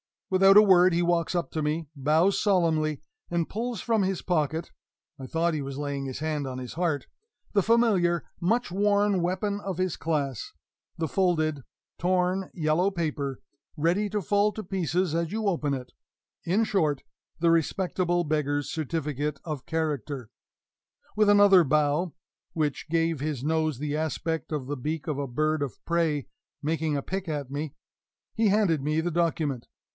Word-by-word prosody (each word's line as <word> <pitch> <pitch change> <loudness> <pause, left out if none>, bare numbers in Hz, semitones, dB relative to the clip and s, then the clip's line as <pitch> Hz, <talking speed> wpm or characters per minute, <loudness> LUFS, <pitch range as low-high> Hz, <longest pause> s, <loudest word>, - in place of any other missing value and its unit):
Without 195 +1 +6
a 210 - +10
word 185 -3 +6
he 170 - +2
walks 170 0 +1
up 175 - -1
to 155 - -2
me, 155 0 -2
bows 155 +7 +2
solemnly, 160 -7 +2 0.3
and 170 -1 -1
pulls 230 0 -3
from 225 -3 +1
his 190 -1 -1
pocket 160 -2 -1 0.5
(I 130 - -7
thought 165 +4 0
he 150 - -2
was 135 0 -5
laying 140 -1 -3
his 130 0 -5
hand 150 -2 -2
on 130 -1 -5
his 125 -1 -6
heart) 160 -6 -1 0.5
the 200 - +3
familiar, 195 -6 +3 0.2
much 230 +5 +1
worn 205 0 +2
weapon 190 +4 -1
of 195 -3 -4
his 185 -2 -1
class 145 -7 -2 0.4
the 160 - -1
folded, 155 -6 +1 0.4
torn 185 +1 +1
yellow 160 +3 +2
paper, 150 -7 -3 0.3
ready 175 +7 +1
to 210 +1 -1
fall 205 +3 +2
to 215 - -6
pieces 180 -2 -1
as 165 -1 -1
you 220 0 -2
open 155 -7 0
it 125 -2 -5 0.5
in 195 +7 +2
short, 155 -10 0 0.4
the 170 0 +4
respectable 175 +1 +1
beggar's 145 -2 -1
certificate 150 -2 -2
of 150 -6 -5
character. 145 -6 -2 0.9
With 210 -1 +4
another 200 -4 +7
bow 150 +4 +1 0.4
(which 155 -1 -2
gave 165 -1 +1
his 145 -3 -3
nose 155 -2 0
the 150 +2 -2
aspect 160 0 -2
of 145 -4 -2
the 145 +2 -4
beak 150 +5 -4
of 150 -3 -2
a 140 - -2
bird 155 +4 0
of 135 -7 -3
prey 165 -5 +1 0.4
making 155 0 0
a 140 - -3
pick 190 -1 -4
at 145 -4 -3
me) 145 +1 -4 0.6
he 225 -1 +2
handed 195 -7 +3
me 155 +3 0
the 175 +2 -2
document. 155 -6 -1
165 Hz, 165 wpm, -27 LUFS, 150-185 Hz, 0.9 s, a